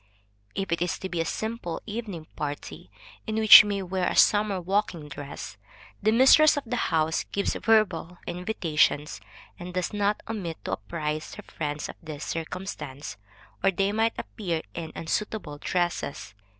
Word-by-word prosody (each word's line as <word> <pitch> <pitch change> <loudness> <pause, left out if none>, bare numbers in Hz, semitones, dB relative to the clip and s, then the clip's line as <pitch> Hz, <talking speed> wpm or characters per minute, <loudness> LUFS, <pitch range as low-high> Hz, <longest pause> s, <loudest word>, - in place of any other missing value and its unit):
If 195 -3 -3
it 170 - 0
is 175 - 0
to 190 - -6
be 175 -2 -1
a - - -1
simple 220 -5 -3
evening 205 -7 -5
party, 145 - -6 0.4
in 215 - -2
which 220 -1 +11
we 210 - -3
may 200 -1 -1
wear 185 0 -1
a - - -3
summer 205 -2 +4
walking 180 -4 -1
dress, 140 -7 -8 0.4
the 215 +2 +3
mistress 270 +6 +7
of 285 - -1
the 240 +2 -2
house 160 0 +1
gives 200 - -1
verbal 190 -6 +1
invitations 170 -5 0 0.4
and 180 0 -8
does 180 +3 -1
not 205 0 0
omit 190 -8 -4
to - - -3
apprise 150 - -4
her - - -9
friends 150 -1 -4
of - - -9
this 155 -3 -7
circumstance, 165 - -5 0.5
or 195 - +5
they 195 +1 +1
might 225 +2 +1
appear 170 -6 -3
in 160 -2 -6
unsuitable 165 -3 -3
dresses. 175 - -2
180 Hz, 160 wpm, -27 LUFS, 160-210 Hz, 0.5 s, which